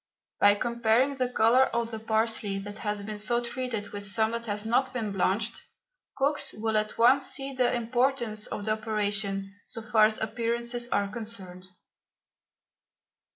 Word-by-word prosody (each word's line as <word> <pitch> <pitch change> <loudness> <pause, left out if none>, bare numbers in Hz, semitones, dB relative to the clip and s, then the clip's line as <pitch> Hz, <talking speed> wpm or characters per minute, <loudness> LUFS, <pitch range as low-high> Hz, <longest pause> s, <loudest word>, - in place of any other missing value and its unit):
By 205 0 +6
comparing 235 +4 +1
the 255 -1 0
colour 250 +2 +4
of 235 -1 -2
the 220 - -5
parsley 220 -2 0
that 205 +2 -7
has 210 -1 -3
been 210 0 -6
so 235 +3 +1
treated 240 -4 -4
with 205 0 -7
some 220 +2 +1
that 235 0 -4
has 205 0 -2
not 260 +3 +1
been 225 -5 -2
blanched, 200 +4 -1 0.6
cooks 280 +2 0
will 220 0 -2
at 215 0 0
once 260 +4 +5
see 275 0 -3
the 255 -2 +2
importance 240 -2 0
of 205 - -5
the 215 - 0
operation 205 -2 0
so 225 - -7
far 215 0 +4
as 220 - -2
appearances 235 +2 -2
are 205 -4 0
concerned. 200 -4 -6
220 Hz, 155 wpm, -28 LUFS, 210-240 Hz, 0.6 s, By